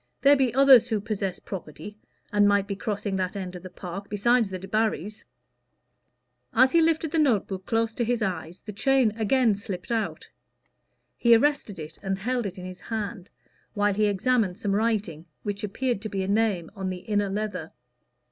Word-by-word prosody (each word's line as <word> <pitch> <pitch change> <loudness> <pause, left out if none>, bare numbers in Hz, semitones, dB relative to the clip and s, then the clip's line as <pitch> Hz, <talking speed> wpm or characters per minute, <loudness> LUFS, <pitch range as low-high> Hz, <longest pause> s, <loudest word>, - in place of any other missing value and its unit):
There 285 +1 +7
be 265 -3 +2
others 270 -3 +7
who 220 - 0
possess 200 -3 -3
property, 190 +2 -8 0.4
and 205 -1 +5
might 200 -1 +3
be 200 - -4
crossing 205 -1 -3
that 185 +1 -2
end 185 -2 -5
of 180 - -8
the 185 - -9
park, 185 +2 -8
besides 225 +2 +2
the 190 - -4
Debarrys." 210 0 -2 1.3
As 260 +3 +6
he 335 - +5
lifted 320 -1 +1
the 325 - +1
note 255 -10 +3
book 190 -1 -7
close 225 0 0
to 240 - -1
his 235 -1 0
eyes, 180 -3 -4
the 210 - -8
chain 265 +1 +3
again 225 +2 +2
slipped 195 0 -6
out. 225 -2 -2 0.9
He 235 -1 +6
arrested 260 -5 +1
it 155 0 -9
and 195 -1 -2
held 240 +2 -1
it 190 0 -8
in 180 - -7
his 185 0 -8
hand, 210 -4 -5 0.5
while 205 0 +2
he 210 +1 +2
examined 205 -1 +1
some 205 -3 -1
writing, 200 -7 -1 0.2
which 205 -1 -4
appeared 235 +2 -1
to 215 - -5
be 195 -2 -2
a - - -3
name 200 -5 +1
on 190 -2 -3
the 180 -1 -5
inner 205 -2 0
leather. 195 -5 -4
205 Hz, 185 wpm, -26 LUFS, 190-230 Hz, 1.3 s, There